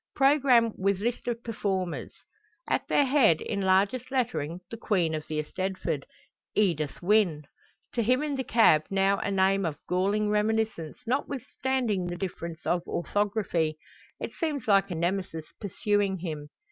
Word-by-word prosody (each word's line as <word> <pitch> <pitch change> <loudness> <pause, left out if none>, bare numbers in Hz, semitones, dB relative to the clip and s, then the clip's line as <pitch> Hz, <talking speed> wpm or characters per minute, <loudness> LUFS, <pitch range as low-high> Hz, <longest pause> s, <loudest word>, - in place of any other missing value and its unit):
Programme 270 -5 +4
with 195 0 +1
list 235 +4 -2
of 235 -1 -2
performers. 195 -5 -2 0.6
At - - 0
their 285 - +3
head 255 - +4
in 200 -2 -3
largest 200 +7 +2
lettering 180 - -1
the 230 - -5
queen 180 -8 +1
of 155 -1 -4
the 155 - -3
eisteddfod: 170 -2 -3 0.5
Edith 165 -7 0
Wynne! 180 -6 +3 0.5
To 235 - +1
him 250 +5 +2
in 295 -2 -1
the 265 - -2
cab 220 -11 +4
now 195 0 +2
a - - -2
name 195 0 +2
of 160 -4 -2
galling 200 +4 +1
reminiscence, 210 -6 0
notwithstanding 255 -5 -1
the 175 0 -4
difference 170 -3 -5
of 175 - +1
orthography. 185 -4 0 0.4
It - - -5
seems 300 -8 -3
like 195 -2 +4
a 175 - -3
Nemesis 170 -1 -2 0.2
pursuing 205 -1 0
him! 155 -4 -5
195 Hz, 145 wpm, -28 LUFS, 175-230 Hz, 0.6 s, Programme